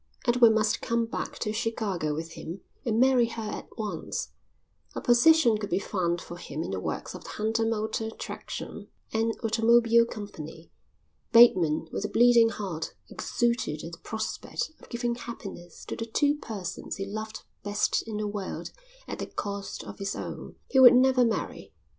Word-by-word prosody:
Edward 235 -2 +6
must 215 -1 +2
come 235 0 +1
back 225 - -5
to 215 -2 -2
Chicago 215 -8 -1
with 165 +1 -5
him 170 +3 -7 0.2
and 225 -2 +1
marry 255 -2 +5
her 230 -1 -5
at - - -7
once. 215 -2 -4 0.6
A - - -2
position 240 -1 +5
could 205 -1 -4
be 180 - +1
found 175 -3 -1
for 175 - -9
him 155 -2 -5
in - - -5
the 95 - -2
works - - -4
of - - -9
the - - -10
Hunter 225 +1 0
Motor 220 0 -1
Traction - - -7 0.3
and 225 0 +1
Automobile 230 +1 +4
Company. 165 -8 -8 0.6
Bateman, 180 -10 +6
with - - -3
a 210 - -2
bleeding 235 0 +6
heart, 190 -8 -5 0.2
exulted 235 - -1
at 165 - -6
the 165 - -10
prospect 220 +7 -4
of - - -16
giving 240 0 -1
happiness 200 -8 -8
to - - -4
the 230 - -5
two 285 +6 +2
persons 200 - -5
he 195 - -4
loved 215 +2 -6 0.2
best 205 0 +1
in 215 -2 -4
the 210 - -2
world 205 -2 -5 0.4
at - - -5
the - - -3
cost 200 -1 -5
of - - -9
his 195 0 -2
own. - - -6 0.2
He 265 - +4
would 250 -1 +10
never 255 0 +5
marry. 230 -2 -2
220 Hz, 170 wpm, -28 LUFS, 195-235 Hz, 0.6 s, would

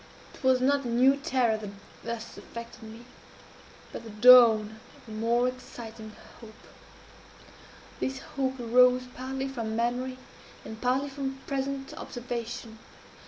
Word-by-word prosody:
"It - - -16
was 260 -1 +4
not 280 +2 +2
a - - -4
new 250 +3 +4
terror 255 -7 +1
that 210 -2 -7 0.3
thus 230 0 -6
affected 235 +1 -10
me, 225 +2 -11 0.9
but - - -7
the 225 - -10
dawn 220 -1 +7 0.2
of - - -21
a - - -10
more 235 +3 +2
exciting 230 -3 -8 0.3
hope. 220 -2 -13 1.4
This 265 0 -2
hope 265 -1 -3
arose 250 +1 +4
partly 265 +1 -4
from 230 -5 -4
memory, 245 +2 -1 0.5
and 220 0 -9
partly 260 +3 +1
from 270 -1 -4
present 275 0 -3
observation. 235 -2 -6
245 Hz, 130 wpm, -28 LUFS, 225-265 Hz, 1.4 s, dawn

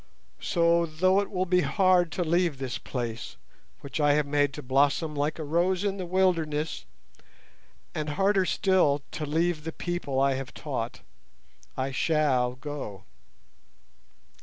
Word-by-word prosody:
So 170 -1 +2
though 185 +5 +2
it 200 - -2
will 185 -2 -1
be 180 0 +3
hard 180 +3 +3
to 180 - -1
leave 170 -2 +1
this 130 -2 -4
place, 120 -3 -5 0.5
which 140 - -5
I 145 -1 +4
have 150 0 +2
made 145 0 +1
to - - -7
blossom 140 +4 +2
like 145 +2 -1
a 160 - -4
rose 175 +5 +1
in 200 -1 -1
the 185 -2 -5
wilderness, 165 - 0 1.1
and 155 -1 -3
harder 195 +4 +2
still 175 -8 +2
to 150 - -4
leave 160 +1 0
the 160 - -4
people 175 -6 -3
I 135 0 +3
have 130 -1 -6
taught, - - -4 0.8
I 130 +1 -1
shall 130 -4 +1
go." 130 - -7
155 Hz, 145 wpm, -27 LUFS, 140-180 Hz, 1.1 s, I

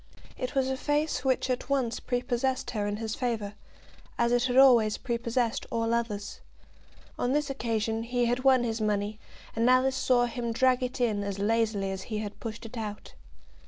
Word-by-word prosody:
It 255 - -5
was 265 -1 +2
a 265 0 -1
face 295 -2 0
which 260 -1 +1
at 255 0 -2
once 255 -4 0
prepossessed 245 +1 -1
her 210 -3 -2
in 205 0 -2
his 220 0 -3
favour, 225 -5 -2 0.6
as 235 0 +2
it 245 +1 +3
had 250 -1 0
always 240 -6 +6
prepossessed 235 -1 -1
all 230 0 0
others. 230 -3 -2 0.8
On 245 +2 +1
this 295 -1 0
occasion 225 -3 -1
he 245 +1 0
had 245 +2 0
won 260 -2 +5
his 225 -1 -2
money, 210 0 -1 0.4
and 230 +2 +3
Alice 260 +1 +4
saw 250 -2 +3
him 235 -1 -3
drag 255 +1 +3
it 255 +1 -3
in 215 -4 +1
as 200 -1 -3
lazily 210 -1 0
as 190 0 -4
he 215 - -2
had 210 -1 -5
pushed 230 0 -6
it 230 +2 -8
out. 210 -1 -6
235 Hz, 185 wpm, -28 LUFS, 220-255 Hz, 0.8 s, always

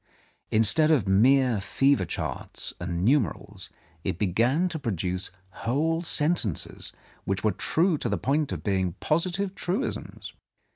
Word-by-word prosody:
Instead 110 +8 +4
of 135 - +3
mere 120 +3 +4
fever 135 +7 +2
charts - - -5
and 90 +1 -2
numerals, 125 - 0 0.3
it - - -2
began 115 - +1
to 165 -3 -4
produce 95 - -3 0.3
whole 160 +7 0
sentences 150 - -1 0.3
which 95 +1 -2
were 110 - +3
true 160 - +1
to 120 - -2
the 105 - 0
point 145 +1 0
of - - -5
being 95 -3 0
posi 165 - 0
tive 195 +1 -2
truisms. 195 +7 -4
130 Hz, 135 wpm, -26 LUFS, 100-160 Hz, 0.3 s, Instead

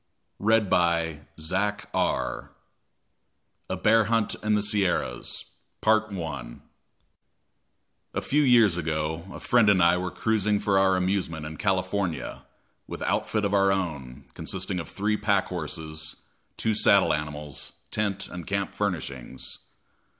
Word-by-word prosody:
Henry 110 +2 +4
T. 85 -5 +1 0.7
Allen. - - -1 1.2
A - - -1
Bear 110 0 +4
Hunt 115 0 +1
in 105 0 +2
the 105 - +1
Sierras 100 - 0 0.4
A 90 - 0 1.6
few 150 +2 +2
years 115 -9 +5
ago, 80 0 -2
a - - -8
friend 120 -4 +4
and 95 -3 +5
I 85 +1 +5
were 90 0 -2
cruising 105 0 +1
for 100 -2 +2
our 95 -1 +4
amusement 90 -4 -1
in 75 0 -7
California, 95 -2 -1 0.4
with - - -6
outfit 105 -1 0
of 100 - 0
our 100 -1 +4
own, 70 -9 -3
consisting 90 - -3
of 85 - -6
three 105 +2 0
pack 100 -2 +2
horses, 80 -2 -5 0.4
two 110 - +1
saddle 100 -2 +5
animals, 75 -1 -5 0.2
tent 100 -2 -1
and 90 -2 -8
camp 100 0 -1
furnishings. 80 -11 -4
95 Hz, 120 wpm, -26 LUFS, 80-105 Hz, 1.6 s, years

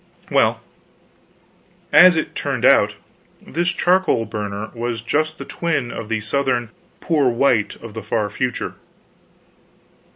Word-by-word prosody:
Well, - - +2 1.3
as 175 +4 +8
it 160 - -2
turned - - -2
out, - - +5 0.4
this 175 +4 -3
charcoal 175 -8 +2
burner 105 0 -5
was 115 -1 -4
just 155 +5 -1
the - - -8
twin 155 -8 -2
of 105 - -7
the 110 -1 -1
Southern 125 0 -1 0.3
"poor 150 -6 +2
white" 120 -3 +1
of 115 -2 -9
the 110 - -6
far 110 0 -1
future. 125 +3 -3
120 Hz, 125 wpm, -20 LUFS, 110-155 Hz, 1.3 s, as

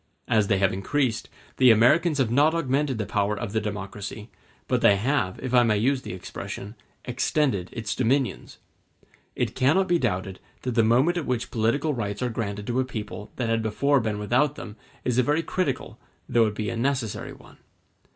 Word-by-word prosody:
As 110 -4 +3
they 100 - +2
have 95 -1 +2
increased, 115 +5 -1 0.3
the 130 -1 +6
Americans 140 +8 +4
have 130 -5 +1
not 150 +6 +4
augmented 140 -4 0
the 110 - -2
power 105 -2 0
of 105 -2 -5
the 110 - +1
democracy, 105 +1 -6 0.4
but - - +1
they 100 - +6
have, 105 -3 0
if 130 -1 -3
I 125 - +7
may 110 -3 +2
use 130 +5 +1
the - - -7
expression, 100 +2 -7 0.3
extended 125 - 0
its 115 -2 -3
dominions. 130 +1 0 0.8
It - - -1
cannot 170 +9 +3
be 175 -2 +2
doubted 95 - -2 0.2
that 125 - -1
the 115 - +4
moment 130 +10 +3
at 165 - -3
which 125 -2 -2
political 120 +7 +1
rights 105 -2 -3
are 125 - 0
granted 105 -2 -4
to 120 +3 -1
a - - +3
people 110 -4 -7
that 120 -3 -2
had 115 0 +1
before 140 +6 +2
been 110 -3 -2
without 130 +8 +1
them 105 -6 -8 0.3
is 125 0 +1
a - - +7
very 150 +6 +1
critical, 135 -10 -2 0.3
though 115 -2 +3
it 105 - -4
be 105 -1 -2
a - - -4
necessary 120 -3 -2
one. - - -17
120 Hz, 190 wpm, -25 LUFS, 105-135 Hz, 0.8 s, I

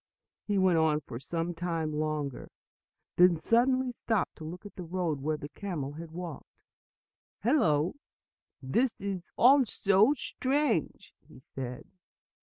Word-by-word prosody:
He 205 -1 +1
went 185 -3 +4
on 155 -1 +2
for 115 - -8
some 165 +5 -3
time 165 -3 -2
longer, 150 -3 -3 0.7
then 180 -1 +7
suddenly 250 +7 +2
stopped 225 -4 -1
to - - -9
look 175 +6 -8
at 205 - -10
the - - -7
road 170 -4 -2
where 155 +2 -1
the 145 - -7
camel 155 -6 -4
had 165 +2 -8
walked. 170 -1 -9 0.8
"Hello, 180 - +3 0.7
this 230 - +1
is 195 -3 -4
also 235 -3 +5
strange!" 260 - -1
he - - -15
said. 130 -1 -7
175 Hz, 130 wpm, -30 LUFS, 155-210 Hz, 0.8 s, then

